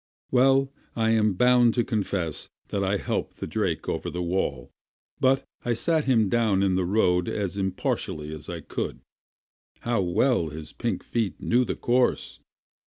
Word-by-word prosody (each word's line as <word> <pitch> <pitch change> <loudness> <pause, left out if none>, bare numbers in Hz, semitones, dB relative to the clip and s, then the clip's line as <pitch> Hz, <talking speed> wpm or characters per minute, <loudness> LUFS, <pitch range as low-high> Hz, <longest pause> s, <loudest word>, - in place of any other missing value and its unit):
Well, 135 +1 +4 0.2
I 115 -1 +2
am 110 -3 +3
bound 125 +1 +4
to 120 - +2
confess 100 - -2 0.2
that 100 - -1
I 100 +1 +1
helped - - -3
the - - -4
drake - - -2
over - - -2
the 90 0 -3
wall, 85 -8 -2 0.5
but 135 +1 +3 0.2
I 120 - +1
sat 160 +6 +1
him 115 -5 +3
down 105 -3 +2
in 95 -1 +2
the 90 -1 +1
road 90 -2 +2
as 100 -3 -2
impartially 90 -5 -2
as 75 -1 -8
I 85 -2 -5
could. - - -4 0.8
How 120 -3 0
well 95 +1 +2
his 75 0 -7
pink 115 -6 -2
feet 115 -4 -2
knew 125 +2 +2
the - - -2
course! 125 +1 +1
105 Hz, 165 wpm, -26 LUFS, 90-120 Hz, 0.8 s, Well